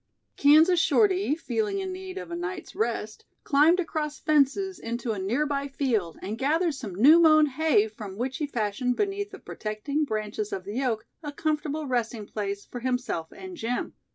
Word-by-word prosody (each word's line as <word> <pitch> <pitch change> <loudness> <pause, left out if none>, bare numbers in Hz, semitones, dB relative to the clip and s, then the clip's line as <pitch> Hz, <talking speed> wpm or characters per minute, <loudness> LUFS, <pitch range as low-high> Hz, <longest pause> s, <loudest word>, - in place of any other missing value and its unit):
Kansas 315 +5 +6
Shorty 380 -5 +3
feeling 400 +4 -2
in 380 -1 -3
need 375 0 -7
of 385 - -7
a - - -3
night's 355 +2 -5
rest, 220 -1 -2 0.2
climbed 310 +5 +4
across 310 -4 -2
fences 310 +6 +2
into 235 0 -3
a 210 - -3
nearby 280 +8 -1
field 235 - -1
and 210 +4 -4
gathered 320 +5 +1
some 225 -10 -7
new 290 - +7
mown 310 -2 +6
hay 295 -6 +2
from 210 -3 -9
which 255 +3 -2
he 300 -3 -2
fashioned 245 0 -1
beneath 405 +3 -1
the 395 - -10
protecting 220 - -3
branches 215 -4 -3
of 190 - -4
the 210 +8 -3
oak 230 -4 -1 0.2
a 295 -2 -5
comfortable 305 0 -2
resting 235 -4 -2
place 200 -1 -4
for 245 - -7
himself 245 -10 -2
and 375 -2 -9
Jim. 245 -1 -3
280 Hz, 175 wpm, -27 LUFS, 220-325 Hz, 0.2 s, new